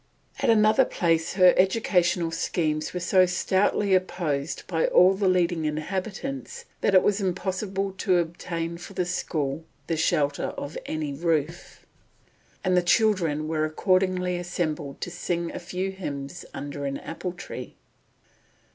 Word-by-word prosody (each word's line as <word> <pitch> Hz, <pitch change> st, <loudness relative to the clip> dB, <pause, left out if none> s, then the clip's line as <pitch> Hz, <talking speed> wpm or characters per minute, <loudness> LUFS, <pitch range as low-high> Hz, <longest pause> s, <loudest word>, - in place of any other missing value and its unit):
At -, -, +1 dB
another 220 Hz, +3 st, +5 dB
place 165 Hz, -7 st, 0 dB
her 185 Hz, -1 st, +6 dB
educational 180 Hz, -3 st, +2 dB
schemes 155 Hz, -2 st, -1 dB
were 180 Hz, -, -3 dB
so 185 Hz, +1 st, +4 dB
stoutly 190 Hz, +2 st, +1 dB
opposed 170 Hz, -5 st, -1 dB
by 165 Hz, -3 st, 0 dB
all 185 Hz, +2 st, +6 dB
the 195 Hz, 0 st, 0 dB
leading 175 Hz, -3 st, +2 dB
inhabitants 200 Hz, -, -4 dB, 0.2 s
that 195 Hz, -, +3 dB
it 185 Hz, -, +7 dB
was 205 Hz, 0 st, +2 dB
impossible 190 Hz, +1 st, -2 dB
to 185 Hz, -4 st, +3 dB
obtain 170 Hz, 0 st, -3 dB
for 185 Hz, -, -10 dB
the 180 Hz, -1 st, -1 dB
school 160 Hz, -4 st, -2 dB, 0.2 s
the 165 Hz, -, -1 dB
shelter 145 Hz, -2 st, 0 dB
of 145 Hz, -, -6 dB
any 155 Hz, -2 st, -3 dB
roof, 165 Hz, +2 st, -2 dB, 0.8 s
and 185 Hz, -2 st, +2 dB
the 180 Hz, -, +5 dB
children 175 Hz, -6 st, +2 dB
were 155 Hz, -1 st, 0 dB
accordingly 180 Hz, +2 st, +1 dB
assembled 155 Hz, -5 st, -3 dB
to 180 Hz, -, -4 dB
sing 170 Hz, -1 st, -2 dB
a -, -, -6 dB
few 180 Hz, +2 st, -3 dB
hymns 140 Hz, -7 st, -6 dB
under 145 Hz, 0 st, -5 dB
an 140 Hz, 0 st, -2 dB
apple 175 Hz, +2 st, -5 dB
tree. 175 Hz, -, -8 dB
175 Hz, 140 wpm, -26 LUFS, 160-190 Hz, 0.8 s, it